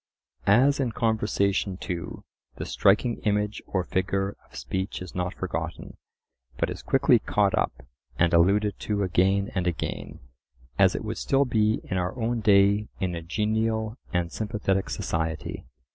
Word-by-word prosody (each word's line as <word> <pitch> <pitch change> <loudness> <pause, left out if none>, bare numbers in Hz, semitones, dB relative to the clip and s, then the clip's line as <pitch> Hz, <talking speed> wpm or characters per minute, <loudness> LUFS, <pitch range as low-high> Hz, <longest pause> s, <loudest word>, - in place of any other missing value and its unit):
As 130 +8 +5
in 125 -4 0
conversation 105 -4 0
too, 85 -2 -5 0.3
the - - -5
striking 110 +4 +2
image 105 0 -1
or 95 -3 0
figure 95 +2 -1
of - - -19
speech 95 +2 -3
is 90 -1 -8
not 90 0 -2
forgotten, - - -5 0.6
but - - 0
is - - -6
quickly - - +4
caught - - +1
up, 65 - -2 0.3
and 85 0 +3
alluded 100 +4 +3
to 105 -1 -1
again 95 +2 +2
and 90 -2 -1
again; 85 -2 -4 0.6
as - - +5
it - - -3
would - - -4
still 135 +1 +2
be 110 -3 +1
in 95 - -3
our 90 +7 -3
own 115 +1 0
day 100 0 +4
in 90 -2 -1
a 85 - -4
genial 110 +4 -1 0.2
and 90 -1 -1
sympathetic 105 -5 -1
society. 80 +4 -3
100 Hz, 150 wpm, -26 LUFS, 90-110 Hz, 0.6 s, As